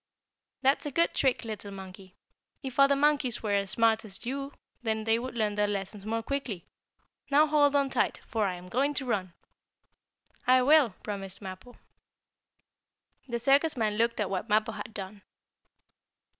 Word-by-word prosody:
"That's 275 +3 +2
a - - -1
good 335 +5 +2
trick, 265 -2 +1
little 215 -2 -6
monkey. 190 -1 -11 0.5
If 265 0 -5
other 275 0 +6
monkeys 280 -5 +1
were 210 - -1
as 200 -1 +1
smart 225 +1 +3
as 200 -1 -8
you 275 +3 -3 0.3
they 225 0 +1
would 255 0 -6
learn 215 -2 0
their 205 0 +1
lessons 200 0 -4
more 225 +1 -1
quickly. 245 -10 -4 0.6
Now 295 +2 +5
hold 290 -2 +3
on 280 -1 +2
tight, - - 0
for 220 -3 0
I 185 - -2
am 180 +1 -11
going 275 +9 0
to 265 - -1
run!" 185 -7 -2 1.1
"I 255 0 +6
will!" 280 -7 +5
promised 195 -2 -6
Mappo. 190 +5 -10 1.5
The 235 -2 -2
circus 280 +4 +3
man 215 -2 +1
looked 230 0 +1
at 205 -2 -1
what 195 +4 -3
Mappo 215 +2 +2
had 225 - -7
done. 200 0 -7
225 Hz, 160 wpm, -29 LUFS, 200-275 Hz, 1.5 s, other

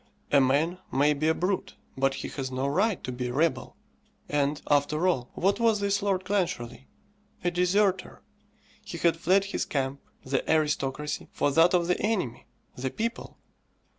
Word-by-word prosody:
A 140 - +6
man 150 +7 +1
may 145 +2 +3
be 150 +2 -1
a 160 - +3
brute, 185 +2 -2 0.2
but 135 0 +1
he - - -5
has 135 -2 -4
no 130 +1 -2
right 195 +7 +1
to 125 - -4
be 125 0 -3
a 120 - -4
rebel. 160 +4 0 0.5
And, 145 0 0
after 150 +4 +2
all, 130 -9 0
what 195 +5 +1
was 225 -2 +3
this 200 0 0
Lord 195 -2 0
Clancharlie? 180 -10 -2 0.6
A 175 - +1
deserter. 185 +1 +1 0.6
He 185 -4 -7
had 170 0 +3
fled 185 +4 +2
his 200 - -2
camp, 135 -1 -2 0.2
the 135 0 0
aristocracy, 150 -2 -1
for 145 - 0
that 165 +5 +5
of 175 -1 +2
the 180 +1 0
enemy, 195 - -2 0.3
the 130 +1 -3
people. 230 - -4
160 Hz, 165 wpm, -27 LUFS, 135-185 Hz, 0.6 s, A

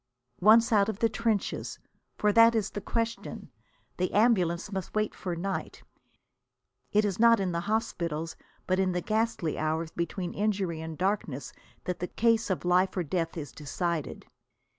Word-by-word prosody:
Once 225 +4 +6
out 205 -1 +4
of 215 - -3
the 230 - +3
trenches! 225 -3 -1 0.4
For 210 -1 +2
that 230 +1 +7
is 215 -2 0
the 205 - -5
question. 230 +2 -3 0.5
The 180 0 0
ambulances 200 -4 +2
must 190 0 -5
wait 215 0 0
for 180 -2 -4
night. 190 +3 -4 1.1
It 210 +1 +3
is 200 -1 -2
not 230 -1 +6
in 190 -2 0
the 170 - -1
hospitals 170 -7 -2 0.3
but 185 0 +1
in 185 -1 +2
the 180 - -1
ghastly 215 -7 -1
hours 160 +1 -1
between 175 +2 -3
injury 195 -6 -1
and 160 -1 -6
darkness 180 -8 -2 0.3
that 180 - -3
the 180 - -2
case 230 +1 +2
of 185 -2 -2
life 180 +2 +2
or 180 - +1
death 165 +2 -2
is 145 -3 -5
decided. 160 +2 -3
190 Hz, 160 wpm, -29 LUFS, 170-215 Hz, 1.1 s, that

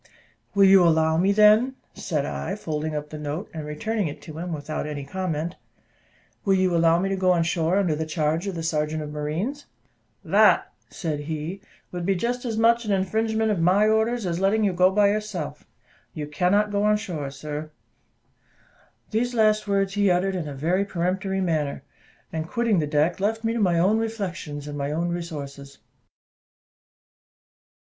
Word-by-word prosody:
"Will 200 - +5
you 195 -1 +7
allow 160 -1 +3
me, 185 +4 +3
then," 215 +5 +5 0.2
said 150 -6 -2
I, 195 - -3
folding 155 -5 -3
up 150 0 -5
the 155 - -6
note, 150 +7 -5
and 155 -2 -6
returning 205 +6 -2
it 145 - -7
to 155 -1 -8
him 175 +1 -4
without 155 -1 -4
any 145 -2 -5
comment, 170 0 -3 0.9
"will 195 -1 +3
you 185 -2 +2
allow 165 0 +4
me 185 +3 0
to 195 - 0
go 185 -1 +2
on 170 -1 +2
shore 170 +1 +1
under 185 -6 +2
the 160 +1 -3
charge 155 +3 -1
of 195 - -3
the 165 - -4
sergeant 155 -1 -1
of 150 - -7
marines?" 165 - -3 0.6
"That," - - +4 0.2
said 155 -4 -3
he, 160 +5 -5 0.3
"would 175 -1 -4
be 195 +2 +1
just 245 +6 -2
as 225 -2 -2
much 235 +1 +4
an 215 - -2
infringement 220 +3 +1
of 200 - 0
my 185 +5 +4
orders 220 +1 +1
as 170 -1 -1
letting 200 +3 +2
you 200 -3 +2
go 180 +1 +4
by 200 +1 +3
yourself. 210 - -4 0.5
You 150 - -4
cannot 185 +8 +1
go 200 0 0
on 210 0 +3
shore, 160 -9 -5
sir." 150 +2 -6 1.4
These 240 +3 0
last 215 -1 +3
words 195 -1 +1
he 205 -1 +2
uttered 185 +2 +1
in 170 -4 -3
a 145 - -6
very 175 +8 +1
peremptory 190 +1 -1
manner, 155 -6 -1 0.5
and, 160 0 -3
quitting 230 -5 +1
the 150 - -1
deck, 150 +4 +1
left 220 +3 -1
me 225 0 0
to 235 - -2
my 180 -5 +2
own 195 +6 +3
reflections 185 -10 -4
and 145 - -6
my 140 0 -2
own 170 +3 -1
resources. 145 -5 -6
180 Hz, 180 wpm, -24 LUFS, 155-205 Hz, 1.4 s, you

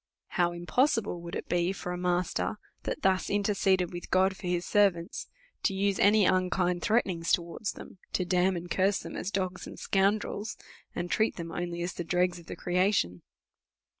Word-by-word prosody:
How 175 -2 +2
im 175 0 -7
possible 225 - +1
would 170 0 -6
it - - -5
be 175 +1 +1
for 185 -2 -5
a - - -2
master, 180 0 0 0.3
that - - -3
thus 190 -1 +2
interceded 195 -3 +2
with 175 - -7
God 190 +1 +3
for 185 - -7
his 175 0 0
servants, 195 -3 +1 0.3
to 195 - +1
use 200 0 +1
any 205 0 +5
unkind 180 -1 +2
threaten 220 -2 +2
ings 165 -2 -2
towards 170 +4 0
them, 190 - -12
to 180 - +1
damn 180 +1 +2
and 175 0 -5
curse 195 +1 +3
them - - -7
as - - -3
dogs 185 -2 -2
and - - -9
scoundrels, 205 +2 0 0.4
and 175 0 -3
treat 220 +1 +2
them 165 -1 -6
only 175 -1 -3
as 175 - -3
the 175 - -4
dregs 180 +1 +1
of 170 - -16
the - - -6
creation 180 - +1
180 Hz, 190 wpm, -29 LUFS, 175-195 Hz, 0.4 s, any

